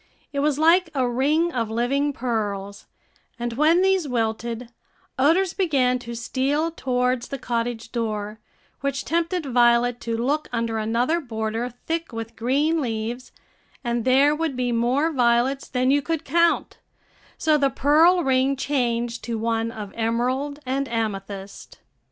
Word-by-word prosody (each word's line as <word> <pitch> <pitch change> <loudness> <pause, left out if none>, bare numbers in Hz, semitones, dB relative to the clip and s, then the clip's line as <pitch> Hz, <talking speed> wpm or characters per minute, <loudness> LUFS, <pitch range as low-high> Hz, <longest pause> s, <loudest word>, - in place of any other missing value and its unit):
It 280 - -1
was 290 0 +1
like 335 +3 +4
a 260 -2 +2
ring 295 +8 +1
of 230 -3 -1
living 265 +6 0
pearls; 205 -6 -3 0.5
and 240 0 -3
when 315 +8 +4
these 380 -4 +2
wilted, 230 0 -2 0.5
odors 330 +6 +3
began 265 -9 +1
to 235 -1 -7
steal 275 +7 -1
towards 250 -4 -1
the 275 - -5
cottage 235 -2 -3
door, 215 -2 -3 0.4
which 275 -1 -2
tempted 335 0 -1
Violet 240 -1 +3
to 230 -1 -2
look 285 +6 -1
under 230 -2 -1
another 235 +9 +1
border 225 -2 -3 0.2
thick 330 -1 -2
with 225 0 -6
green 290 +7 +1
leaves, 235 0 -4 0.5
and 235 -1 -1
there 270 +4 +4
would 320 -3 -2
be 250 -1 -1
more 250 +7 +1
violets 250 0 +2
than 255 0 +1
you 285 +1 +3
could 325 +2 -3
count; 335 +4 +1 0.6
so 310 -1 +2
the 280 -2 +3
pearl 325 +7 +4
ring 265 0 +2
changed 240 -4 -1
to 230 -1 -2
one 225 0 -1
of 210 -3 -8
emerald 255 +6 -1
and 270 +2 -1
amethyst. 200 -3 -5
250 Hz, 145 wpm, -23 LUFS, 230-290 Hz, 0.6 s, like